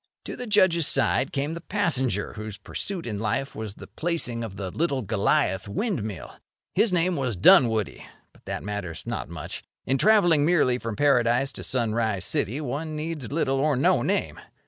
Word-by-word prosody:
To -, -, -5 dB
the 250 Hz, -, -6 dB
Judge's 185 Hz, -7 st, +4 dB
side 135 Hz, 0 st, +1 dB
came 140 Hz, +3 st, -2 dB
the 170 Hz, -, -6 dB
passenger 135 Hz, -, -1 dB
whose 110 Hz, -1 st, -7 dB
pursuit 175 Hz, -, -5 dB
in 105 Hz, -4 st, -4 dB
life 115 Hz, +6 st, -2 dB
was 110 Hz, -2 st, -5 dB
the -, -, -10 dB
placing 155 Hz, -9 st, -2 dB
of 105 Hz, -4 st, -6 dB
the 95 Hz, -2 st, -5 dB
Little 140 Hz, -, -1 dB
Goliath 100 Hz, -1 st, +1 dB
windmill. 110 Hz, -, -4 dB, 0.4 s
His 210 Hz, +2 st, +3 dB
name 180 Hz, 0 st, +2 dB
was 130 Hz, -7 st, -1 dB
Dunwoody; 110 Hz, +3 st, +4 dB, 0.3 s
but -, -, -24 dB
that -, -, -4 dB
matters 105 Hz, -5 st, -5 dB
not -, -, -4 dB
much. 80 Hz, -3 st, -6 dB, 0.2 s
In 135 Hz, +1 st, +1 dB
travelling 175 Hz, -8 st, +5 dB
merely 145 Hz, -7 st, +3 dB
from 115 Hz, -3 st, -4 dB
Paradise 125 Hz, -1 st, +2 dB
to -, -, -7 dB
Sunrise 110 Hz, -6 st, 0 dB
City 120 Hz, +9 st, 0 dB
one 155 Hz, +2 st, -4 dB
needs 150 Hz, -5 st, -5 dB
little 135 Hz, -3 st, 0 dB
or 150 Hz, +1 st, +2 dB
no 130 Hz, -, +3 dB
name. -, -, -1 dB
130 Hz, 170 wpm, -25 LUFS, 110-165 Hz, 0.4 s, travelling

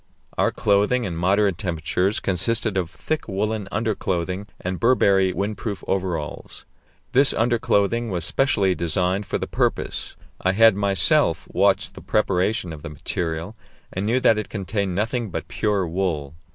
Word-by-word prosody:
Our -, -, +2 dB
clothing 105 Hz, +5 st, +2 dB
in 90 Hz, -6 st, -3 dB
moderate 95 Hz, +2 st, +2 dB
temperatures 90 Hz, +2 st, -1 dB
consisted 105 Hz, +3 st, 0 dB
of 90 Hz, -3 st, -1 dB
thick 155 Hz, -, -4 dB
woollen 105 Hz, 0 st, -2 dB
underclothing 95 Hz, -3 st, -2 dB
and 95 Hz, 0 st, -4 dB
Burberry 100 Hz, -6 st, +4 dB
windproof 100 Hz, +2 st, -3 dB
overalls. 90 Hz, -6 st, -3 dB, 0.5 s
This 135 Hz, +2 st, +4 dB
underclothing 115 Hz, -1 st, +1 dB
was 90 Hz, -4 st, -2 dB
specially 100 Hz, -4 st, +2 dB
designed 90 Hz, +4 st, -1 dB
for -, -, -1 dB
the -, -, -3 dB
purpose; -, -, -2 dB, 0.3 s
I 95 Hz, -, +2 dB
had 110 Hz, 0 st, +6 dB
myself 100 Hz, -3 st, +2 dB
watched -, -, +2 dB
the -, -, -11 dB
preparation 95 Hz, -3 st, 0 dB
of 75 Hz, -, -9 dB
the 85 Hz, -, -7 dB
material, 80 Hz, +4 st, -3 dB, 0.4 s
and 95 Hz, +2 st, -2 dB
knew 120 Hz, +3 st, +2 dB
that 110 Hz, -3 st, +4 dB
it 110 Hz, -, -5 dB
contained 100 Hz, -2 st, -2 dB
nothing 110 Hz, +3 st, -1 dB
but -, -, -5 dB
pure 100 Hz, -4 st, 0 dB
wool. 80 Hz, -5 st, -2 dB
95 Hz, 145 wpm, -23 LUFS, 90-110 Hz, 0.5 s, had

